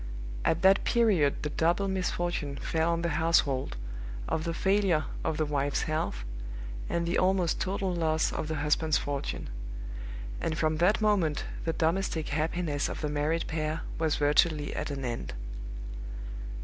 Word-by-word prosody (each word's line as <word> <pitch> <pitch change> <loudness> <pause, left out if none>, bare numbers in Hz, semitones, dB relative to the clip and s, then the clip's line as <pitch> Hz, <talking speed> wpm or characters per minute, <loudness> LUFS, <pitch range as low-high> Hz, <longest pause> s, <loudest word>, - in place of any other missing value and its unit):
At 165 +3 +2
that 190 +1 +6
period 200 -12 +3
the 150 - -1
double 170 +6 +2
misfortune 175 -6 -1
fell 160 +3 +1
on 170 0 0
the 170 -1 0
household, 140 - +2 0.5
of 160 - -1
the 165 - -1
failure 190 -5 +3 0.2
of 160 -1 0
the 155 - +2
wife's 145 -1 0
health, 155 - -1 0.6
and 170 0 0
the 170 - +2
almost 185 -2 +2
total 190 0 0
loss 160 -2 +1
of 155 - -2
the 160 - -2
husband's 155 +1 +2
fortune; 140 -1 -3 0.9
and 160 - -1
from 155 -1 +2
that 185 +7 +4
moment 190 -9 +2 0.2
the 165 - +1
domestic 165 -1 0
happiness 155 0 0
of - - -5
the 150 - -1
married 150 +3 0
pair 155 0 -2 0.2
was 160 -2 +2
virtually 150 +1 +3
at - - -2
an 135 -2 -3
end. 120 - -3
160 Hz, 150 wpm, -30 LUFS, 150-175 Hz, 0.9 s, that